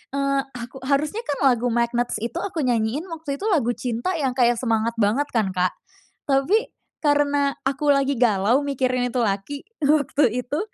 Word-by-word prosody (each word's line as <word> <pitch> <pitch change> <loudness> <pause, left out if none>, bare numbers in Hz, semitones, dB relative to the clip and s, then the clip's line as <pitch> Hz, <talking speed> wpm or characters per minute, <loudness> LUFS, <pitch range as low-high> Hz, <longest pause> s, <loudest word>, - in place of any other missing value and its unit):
eee, 275 0 +1 0.2
aku 240 +3 -9
harusnya 300 +10 +1
kan 285 - 0
lagu 245 -1 +1
Magnets 240 +1 0
itu 235 +8 -4
aku 350 - -5
nyanyiin 235 +6 0
waktu 310 -4 -5
itu 405 - -5
lagu 245 -7 +2
cinta 240 +7 -3
yang 260 -2 0
kayak 240 -1 +3
semangat 230 -2 0
banget 225 +7 +2
kan 220 -4 +2
Kak, 180 0 +1 0.5
tapi 295 - +2 0.3
karena 285 -1 +2
aku 280 +2 0
lagi 275 0 +1
galau 225 +1 +3
mikirin 255 -3 0
itu 245 - -2
laki 205 +7 -2 0.2
waktu 290 -1 +2 0.2
itu, 285 +5 -3
265 Hz, 160 wpm, -23 LUFS, 235-285 Hz, 0.5 s, kayak